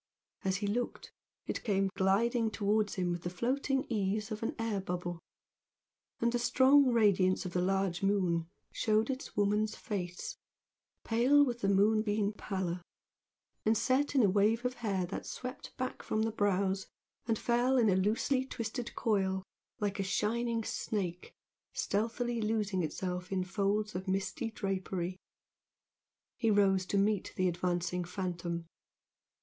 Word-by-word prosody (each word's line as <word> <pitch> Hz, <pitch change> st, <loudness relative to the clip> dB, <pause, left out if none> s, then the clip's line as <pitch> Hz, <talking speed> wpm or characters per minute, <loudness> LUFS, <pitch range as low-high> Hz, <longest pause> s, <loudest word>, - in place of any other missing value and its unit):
As 190 Hz, -1 st, +1 dB
he 205 Hz, -, -3 dB
looked, 235 Hz, +4 st, -2 dB, 0.3 s
it -, -, -3 dB
came 195 Hz, -3 st, +1 dB
gliding 225 Hz, +5 st, +2 dB
towards 210 Hz, 0 st, +1 dB
him 180 Hz, -2 st, 0 dB
with 175 Hz, -1 st, -3 dB
the 175 Hz, -, -3 dB
floating 265 Hz, +8 st, 0 dB
ease 210 Hz, 0 st, -1 dB
of 215 Hz, -, -4 dB
an 225 Hz, -, -2 dB
air 225 Hz, -3 st, -1 dB
bubble, 175 Hz, -2 st, -4 dB, 1.0 s
and 235 Hz, 0 st, +2 dB
the 240 Hz, -, 0 dB
strong 265 Hz, +3 st, +5 dB
radiance 195 Hz, -5 st, +3 dB
of 180 Hz, -, -5 dB
the 180 Hz, -, +1 dB
large 190 Hz, -1 st, 0 dB
moon 180 Hz, -4 st, +1 dB, 0.2 s
showed 220 Hz, +3 st, +1 dB
its 260 Hz, -4 st, -7 dB
woman's 210 Hz, +1 st, +2 dB
face, 180 Hz, -5 st, -4 dB, 0.7 s
pale 260 Hz, +6 st, +5 dB
with 240 Hz, -3 st, -3 dB
the 195 Hz, -, +1 dB
moonbeam 210 Hz, +1 st, +3 dB
pallor, 185 Hz, -4 st, -3 dB, 0.8 s
and 220 Hz, +1 st, +3 dB
set 260 Hz, +6 st, +1 dB
in 260 Hz, -, +5 dB
a -, -, +6 dB
wave 215 Hz, +5 st, +2 dB
of 250 Hz, -, +1 dB
hair 195 Hz, -5 st, 0 dB
that 180 Hz, -, -6 dB
swept 255 Hz, +2 st, -7 dB
back 255 Hz, 0 st, -3 dB
from 220 Hz, -, 0 dB
the 225 Hz, -, 0 dB
brows 195 Hz, -2 st, +1 dB, 0.4 s
and 225 Hz, -2 st, +2 dB
fell 245 Hz, +3 st, +2 dB
in 235 Hz, -3 st, +4 dB
a 190 Hz, -, +4 dB
loosely 220 Hz, +7 st, +1 dB
twisted 235 Hz, -1 st, -5 dB
coil 190 Hz, -4 st, +1 dB, 0.4 s
like 205 Hz, -1 st, -1 dB
a -, -, +1 dB
shining 230 Hz, +4 st, 0 dB
snake 180 Hz, -6 st, -3 dB, 0.4 s
stealthily 230 Hz, +3 st, -1 dB
losing 210 Hz, -3 st, 0 dB
itself 180 Hz, +3 st, -3 dB
in 190 Hz, -1 st, +1 dB
folds 205 Hz, +3 st, 0 dB
of 185 Hz, +2 st, -5 dB
misty 195 Hz, +5 st, -1 dB
drapery. 190 Hz, -4 st, -3 dB, 1.2 s
He 230 Hz, -2 st, +1 dB
rose 195 Hz, -3 st, +3 dB
to 200 Hz, -, 0 dB
meet 205 Hz, 0 st, +1 dB
the 185 Hz, -, +2 dB
advancing 175 Hz, 0 st, -1 dB
phantom. 175 Hz, -2 st, -3 dB
205 Hz, 145 wpm, -32 LUFS, 185-225 Hz, 1.2 s, a